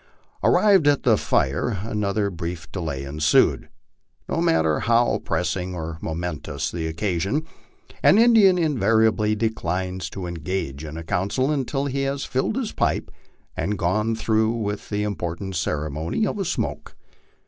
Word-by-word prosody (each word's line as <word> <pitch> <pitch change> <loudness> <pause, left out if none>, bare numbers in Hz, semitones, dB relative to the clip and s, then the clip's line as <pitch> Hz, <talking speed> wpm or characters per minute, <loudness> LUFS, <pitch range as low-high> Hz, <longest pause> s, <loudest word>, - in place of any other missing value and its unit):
Arrived 195 -7 +5
at 145 -1 +3
the 115 -3 +5
fire, 100 - 0
another 105 -2 -1
brief 85 -1 -6
delay 80 -7 -4
ensued. 75 +3 +2 0.6
No - - -1
matter 80 -1 +2
how 120 +1 +2
pressing 90 -1 -2
or 80 -1 -5
momentous 80 -2 -4
the 80 -2 -3
occasion, 95 - -1 0.6
an 195 - +6
Indian 220 -5 +6
invariably 110 - +2
declines 95 -4 -2
to 95 -2 -6
en 85 - -4
gage 80 -4 -4
in 80 0 -7
a 80 - -6
council 100 - 0
until 140 -1 -1
he 140 0 -1
has 135 0 -2
filled 130 +11 -1
his 255 -5 -2
pipe - - -1 0.4
and 100 +5 -1
gone 105 +6 0
through 110 0 +1
with 105 -3 -4
the 105 0 -1
im 105 -1 -1
portant 90 +4 -4
ceremony 75 - -1
of 205 - -3
a 195 - -1
smoke. - - -3
100 Hz, 150 wpm, -23 LUFS, 80-120 Hz, 0.6 s, an